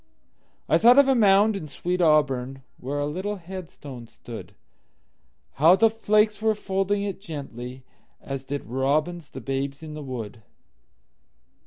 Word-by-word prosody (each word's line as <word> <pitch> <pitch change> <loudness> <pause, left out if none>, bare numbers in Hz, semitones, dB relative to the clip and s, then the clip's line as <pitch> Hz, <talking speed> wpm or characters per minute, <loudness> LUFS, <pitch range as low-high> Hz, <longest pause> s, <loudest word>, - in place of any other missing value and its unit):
I 160 - +4
thought 240 +5 +7
of 280 -1 +7
a 270 - +5
mound 210 -2 +4
in 160 -6 -5
sweet 180 +5 -3
AuburnWhere 135 -3 0
a 145 - 0
little 185 +8 -3
headstone 165 - -9
stood; 115 0 -10 1.1
How 165 +4 +8
the 225 +2 +4
flakes 215 -1 +2
were 220 0 +2
folding 200 0 -1
it 195 -2 -4
gently, 130 - -7 0.4
As 135 -1 -6
did 140 +1 -5
robins 145 +6 -1
the - - -9
babes 135 +2 -3
in 155 -1 -7
the 150 - -7
wood. 120 -5 -7
155 Hz, 140 wpm, -25 LUFS, 135-200 Hz, 1.1 s, How